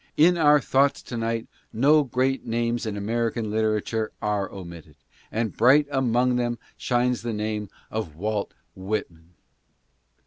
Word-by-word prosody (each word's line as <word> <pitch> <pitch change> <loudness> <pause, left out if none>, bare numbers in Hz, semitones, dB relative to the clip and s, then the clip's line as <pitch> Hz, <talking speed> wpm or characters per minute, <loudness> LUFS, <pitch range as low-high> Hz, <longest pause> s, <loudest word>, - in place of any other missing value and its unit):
In 175 +4 +6
our 150 -3 +5
thoughts 140 +1 +2
to 120 - -7
night 115 0 -2 0.2
no 145 +6 +4
great 130 +1 0
names 115 0 -1
in 105 -1 -3
American 115 +1 -1
literature 110 0 0
are 105 -2 -1
omitted, 85 -5 -10 0.4
and 110 0 -2
bright 140 +5 +5
among 125 -2 +2
them 120 -1 -1 0.2
shines 125 0 0
the 115 0 -3
name 105 -1 -3 0.2
of 105 -9 -4
Wait 105 +4 -2 0.3
Whitman. 90 -4 -5
115 Hz, 135 wpm, -25 LUFS, 105-125 Hz, 0.4 s, In